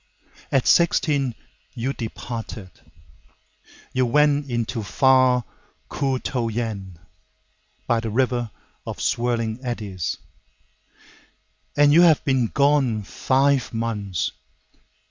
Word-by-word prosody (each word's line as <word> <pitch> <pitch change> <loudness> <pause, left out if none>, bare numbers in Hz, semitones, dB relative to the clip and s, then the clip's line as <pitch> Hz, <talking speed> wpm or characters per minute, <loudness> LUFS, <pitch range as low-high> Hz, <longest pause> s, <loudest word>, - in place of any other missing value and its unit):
At 135 - +2
sixteen 145 -7 +2 0.4
you 125 +3 -2
departed, 115 -4 -6 1.2
You 130 -1 +2
went 145 +2 +2
into 120 -1 -2
far 130 +2 +3 0.5
Ku 135 -2 -1
to 125 -3 -2
Yen, 105 -6 -4 0.9
by 120 - +1
the 115 0 -4
river 120 0 0 0.4
of - - -5
swirling 115 -1 -1
eddies, 105 -8 -4 1.6
And 145 0 +5
you 170 - +7
have 165 -4 +5
been 130 -4 +2
gone 140 -5 +2
five 135 +4 +1
months. 105 -7 -2
120 Hz, 95 wpm, -23 LUFS, 115-135 Hz, 1.6 s, you